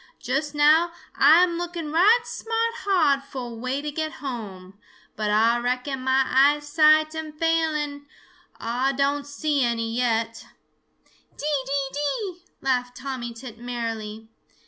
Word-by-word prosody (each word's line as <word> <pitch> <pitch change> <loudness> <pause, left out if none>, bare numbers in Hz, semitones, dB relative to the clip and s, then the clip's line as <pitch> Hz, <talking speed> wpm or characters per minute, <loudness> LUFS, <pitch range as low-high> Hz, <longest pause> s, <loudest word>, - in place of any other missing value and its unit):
Just 280 +4 -2
now, 310 +4 +5 0.2
Ah 310 +6 +7
am 345 -2 0
looking 340 -3 -4
right 410 +9 +5
smart 460 0 -2
hard 310 -9 +2
fo' 270 -2 -7
a - - -8
way 255 +5 -3
to 300 - -3
get 315 +1 -3
home, 200 -9 -7 0.4
but 215 -1 -2
Ah 225 +3 +3
reckon 250 +2 -2
mah 260 +1 +3
eyesight 295 +3 +4
am 315 -1 -5
failing; 305 -3 -1 0.5
Ah 250 +4 0
don' 280 +1 +1
see 285 0 -1
any 230 -1 -1
yet." 230 -2 0 0.9
"Dee, 290 -2 -1
dee, 275 0 -1
dee!" 335 +6 -3 0.2
laughed 250 -2 -1
Tommy 260 -3 -5
Tit 230 -1 -10
merrily. 225 -3 -5
275 Hz, 135 wpm, -24 LUFS, 245-310 Hz, 0.9 s, Ah